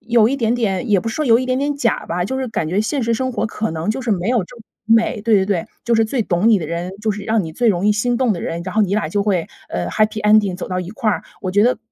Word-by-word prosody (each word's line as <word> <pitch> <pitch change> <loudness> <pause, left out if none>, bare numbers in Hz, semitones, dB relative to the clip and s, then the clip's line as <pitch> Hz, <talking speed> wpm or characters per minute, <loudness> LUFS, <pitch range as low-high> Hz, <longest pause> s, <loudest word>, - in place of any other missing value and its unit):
有 230 -2 +3
一 275 - -1
点 230 -2 +1
点 220 -2 -1
也 200 -3 +4
不 225 - -4
是 - - -4
说 305 - 0
有 230 -3 +5
一 255 - -3
点 255 0 0
点 285 +1 0
假 240 -6 0
吧， 175 +1 -1
就 265 +7 -3
是 260 - -2
感 165 -8 -2
觉 185 +5 +1
现 265 +5 -1
实 230 0 0
生 260 +2 -2
活 - - -1
可 220 -3 -3
能 165 +5 -2
就 240 - -2
是 235 - -2
没 185 +1 -1
有 240 -6 +2
这 245 - -15
么 230 - -13 0.2
美 225 -1 +3
对 225 -1 +3
对 190 - +3
对， 190 -5 -1 0.2
就 235 - +2
是 225 - +4
最 230 +2 -1
懂 185 +3 +1
你 215 -3 +5
的 160 - -4
人， 170 +3 -4
就 220 - +1
是 205 0 -7
让 220 -1 +1
你 160 - -7
最 235 +8 +1
容 185 -2 +1
易 - - +5
心 240 +3 0
动 245 -3 +2
的 170 - -5
人， 170 +1 -4
然 185 - -5
后 220 - +4
你 200 0 0
俩 210 -7 0
就 200 +4 0
会， 185 -5 0 0.2
呃， 90 -1 -3
happy 215 - 0
ending 210 -3 +4
走 180 - -6
到 185 - -2
一 180 0 -6
块 220 0 -1
儿。 - - -3 0.2
我 185 - -2
觉 205 +3 +3
得， 250 -1 +2
215 Hz, 395 characters per minute, -19 LUFS, 185-235 Hz, 0.2 s, 有